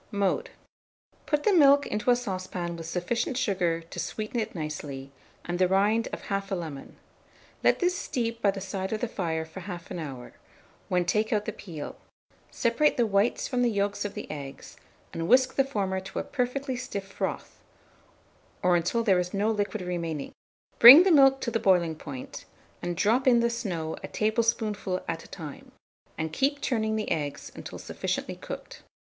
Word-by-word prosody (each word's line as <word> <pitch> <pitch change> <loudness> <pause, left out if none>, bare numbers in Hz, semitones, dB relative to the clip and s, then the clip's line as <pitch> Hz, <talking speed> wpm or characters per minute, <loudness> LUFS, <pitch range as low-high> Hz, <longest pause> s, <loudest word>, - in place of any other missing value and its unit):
Mode. 205 - 0 0.8
Put 295 -1 +1
the 420 - +4
milk 285 -4 +6
into 210 +4 -2
a 245 - +7
saucepan 185 -6 -4
with 165 -1 -7
sufficient 185 +9 -1
sugar 180 -8 0
to 165 +1 -9
sweeten 215 +7 -3
it 215 - -3
nicely, 145 -4 -5 0.3
and 175 0 -3
the 185 - +4
rind 205 +5 +2
of - - -6
1/2 195 -1 -2
lemon. 150 -5 -8 0.7
Let - - +4
this 360 0 +1
steep 230 -10 -3
by 205 - +4
the 195 0 -2
side 190 0 -4
of 215 - -1
the 245 - -1
fire 160 -6 -2
for 160 +4 -10
1/2 175 -2 -7
hour, 135 -6 -7 0.6
when 180 -1 +2
take 215 +4 +1
out 210 -1 +1
the - - -2
peel; 165 -9 -8 0.5
separate 245 +5 +2
the 240 - +3
whites 200 +2 +1
from 250 -2 0
the 245 - +3
yolks 200 -1 -1
of 205 0 -5
the - - -5
eggs, 140 -3 -8 0.4
and 165 0 -3
whisk 255 +4 +5
the 275 - +3
former 200 -8 -2
to 190 +1 -9
a - - 0
perfectly 260 +1 -2
stiff 200 -5 -5
froth, 195 - -4 1.0
or 180 -1 +4
until 175 +7 +1
there 195 -5 +4
is 180 +2 -3
no 210 +3 +2
liquid 205 -1 -2
remaining; 170 -5 -4 0.5
bring 265 +9 +12
the 380 - +3
milk 270 -3 +6
to 235 - -2
the 225 - 0
boiling 180 -5 +3
point, 145 -4 -8 0.4
and 175 -1 -3
drop 230 +8 +2
in 240 -2 +6
the 235 0 +2
snow 175 -9 -3
a - - -6
tablespoonful 215 -3 0
at 165 -1 -3
a - - -13
time, 155 -6 -9 0.5
and 160 0 -3
keep 280 - +1
turning 220 -5 0
the 215 -1 -2
eggs 145 -3 -3
until - - -8
sufficiently - - -3
cooked. - - -8
200 Hz, 180 wpm, -27 LUFS, 175-235 Hz, 1.0 s, bring